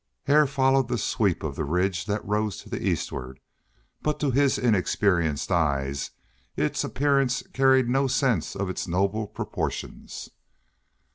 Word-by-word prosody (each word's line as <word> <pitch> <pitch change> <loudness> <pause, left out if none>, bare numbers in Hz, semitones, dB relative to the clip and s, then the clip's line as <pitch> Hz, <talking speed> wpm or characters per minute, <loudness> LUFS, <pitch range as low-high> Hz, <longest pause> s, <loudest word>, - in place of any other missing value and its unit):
Hare 150 +1 +4
followed 135 -1 +2
the 125 -1 -1
sweep 105 -4 0
of 75 -3 -3
the 80 - -2
ridge 90 +4 0
that 105 +1 -2
rose 105 -1 -1
to - - -14
the - - -4
eastward, 65 0 -3 0.6
but 150 0 -1
to 145 -3 +1
his 140 +1 +3
inexperienced 90 - +1
eyes 70 -5 0 0.5
its - - 0
appearance 140 -2 +1
carried 130 -1 +4
no 135 +3 +2
sense 125 - 0
of 100 0 -2
its 95 - -4
noble 100 +5 0
proportions. - - -5
105 Hz, 140 wpm, -26 LUFS, 85-130 Hz, 0.6 s, Hare